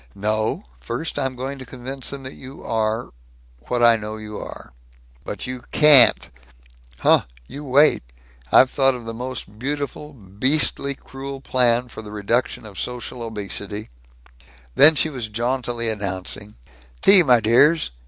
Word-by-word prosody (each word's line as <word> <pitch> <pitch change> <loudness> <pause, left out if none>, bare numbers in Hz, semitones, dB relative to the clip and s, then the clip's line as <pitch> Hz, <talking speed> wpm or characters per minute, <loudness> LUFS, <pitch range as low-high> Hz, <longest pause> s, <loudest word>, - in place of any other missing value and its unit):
"No; 110 - -2
first 145 - -5
I'm 135 -2 -2
going 135 +2 -6
to - - -8
convince 130 +1 -5
them 140 -1 -6
that 130 - -8
you 135 +1 -12
are 110 +1 -2 0.6
what 120 -1 -1
I 115 -1 +6
know 110 0 -7
you 105 -1 -9
are." 60 - -10 0.5
"But - - -6
you 125 -1 -6
can't." 150 -5 +7 0.7
"Huh! - - +4 0.2
You 145 - -9
wait! 145 +2 +4 0.5
I've 130 - +5
thought 135 -1 +2
of 120 -2 -9
the 115 - -6
most 120 -3 -7
beautiful, 145 +3 -5
beastly 130 +6 -1
cruel 135 +1 -9
plan 125 -2 +1
for 110 - -10
the 105 -1 -11
reduction 110 +3 -2
of 100 -3 -9
social 125 0 -5
obesity 105 - -5 0.4
" - - -27 0.3
Then 155 - +8
she 155 +2 0
was 125 -5 -5
jauntily 120 +1 -3
announcing, 105 0 -4 0.5
"Tea, 195 -1 +8
my 125 -7 +4
dears. 125 - +3
125 Hz, 150 wpm, -21 LUFS, 110-135 Hz, 0.7 s, Then